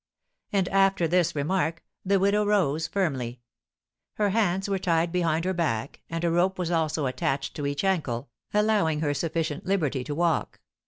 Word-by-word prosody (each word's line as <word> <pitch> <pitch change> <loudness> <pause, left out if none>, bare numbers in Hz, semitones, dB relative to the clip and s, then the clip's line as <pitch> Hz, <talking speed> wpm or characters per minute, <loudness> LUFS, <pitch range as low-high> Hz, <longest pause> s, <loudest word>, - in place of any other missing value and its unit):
And 195 -3 +1
after 195 -3 +3
this 170 0 +2
remark 165 +2 -1 0.2
the 195 +1 +3
widow 200 +2 +3
rose 165 -7 +1
firmly. 130 -11 -2 0.7
Her 205 -2 +1
hands 195 -3 +1
were 195 -1 0
tied 170 -2 +1
behind 165 -2 +1
her 185 - +1
back, 135 -8 -2
and 165 0 -3
a 170 - +2
rope 180 +3 +2
was 175 -2 -2
also 155 -3 0
attached 135 +1 -2
to 145 -2 -2
each 145 +3 -2
ankle, 145 -12 -1 0.2
allowing 210 -8 +2
her 145 -2 +1
sufficient 160 0 -2
liberty 150 -9 0
to 145 - -4
walk. 170 0 0
170 Hz, 165 wpm, -26 LUFS, 150-190 Hz, 0.7 s, after